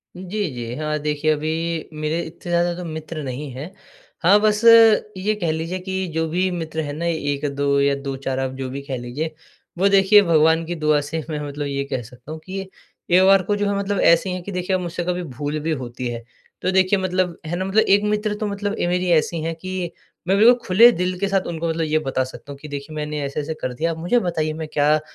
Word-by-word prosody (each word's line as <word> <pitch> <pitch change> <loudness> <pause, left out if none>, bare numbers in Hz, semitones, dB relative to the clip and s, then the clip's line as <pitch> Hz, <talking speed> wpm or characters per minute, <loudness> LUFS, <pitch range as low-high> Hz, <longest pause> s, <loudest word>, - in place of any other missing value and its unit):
जी, 190 +2 -3
जी। 120 -2 -5
हाँ, 150 +1 -2
देखिए, 150 +1 0
अभी 160 +2 -2
मेरे 155 +2 -2
इतने 170 +2 -10
ज़्यादा 175 0 +2
तो 180 - -6
मित्र 155 -1 -6
नहीं 135 +2 -5
है। 140 +8 -7 0.5
हाँ, 195 +5 +6
बस 210 0 +2
अ, - - +8 0.5
ये 210 +3 0
कह 165 -2 +1
लीजिए 165 +4 -3
कि 190 0 -3
जो 160 0 0
भी 180 +3 +1
मित्र 160 -2 -3
है 145 -2 -4
ना, 160 +3 -4
1-2 145 -3 0
या 140 0 +3
2-4, 135 -1 -4
आप 130 -1 -1
जो 130 -1 -4
भी 140 +2 -5
कह 140 -2 -5
लीजिए, 130 +7 -4 0.4
वो 190 +3 +3
देखिए 200 +1 +6
भगवान 165 -2 +3
की 175 +1 -4
दुआ 155 -2 +2
से 155 +2 -4
मैं 150 -2 -3
मतलब 145 +1 -4
ये 140 0 -2
कह 130 - -1
सकता 125 +5 -13
हूँ 160 - -6
कि 185 - -9
ये 195 0 -4 0.5
एक 185 - +6
बार 195 -1 +6
को 205 +3 0
जो 205 0 0
है, 200 - 0
मतलब 200 0 -1
ऐसी 170 +3 +4
हैं 180 0 -3
कि 200 - -6
देखिए, 180 0 -1
अब 185 - -1
मुझसे 175 0 -4
कभी 180 0 -1
भूल 145 +1 -4
भी 160 +2 -2
होती 120 +1 -5
है, 120 -1 -5 0.4
तो 185 - +1
देखिए, 190 +1 +3
मतलब 185 -2 -1
है 160 +2 -3
ना, 185 +2 -2
मतलब 195 +3 +3
एक 200 +1 +4
मित्र 210 0 0
तो 210 0 -3
मतलब 205 0 -3
ए - - +1
मेरी 180 +1 0
ऐसी 165 0 +2
हैं 165 +1 -3
कि 185 0 -4 0.4
मैं 190 - +3
बिल्कुल 225 +4 +8
खुले 225 +6 +7
दिल 180 -2 -2
के 200 - 0
साथ 195 -1 +2
उनको 170 -1 -3
मतलब 165 0 -1
ये 155 0 +1
बता 130 -1 0
सकता 130 +2 -10
हूँ 140 - -8
कि, 150 - -9
"देखिए, 145 +1 -7
मैंने 150 0 -3
ऐसे-ऐसे 145 +3 -3
कर 130 - -2
दिया, 165 +7 -1
अब 160 - -5
मुझे 175 +9 +2
बताइए, 160 -6 -1
मैं 160 0 -5
क्या 150 +1 +2
165 Hz, 240 wpm, -22 LUFS, 150-185 Hz, 0.5 s, अ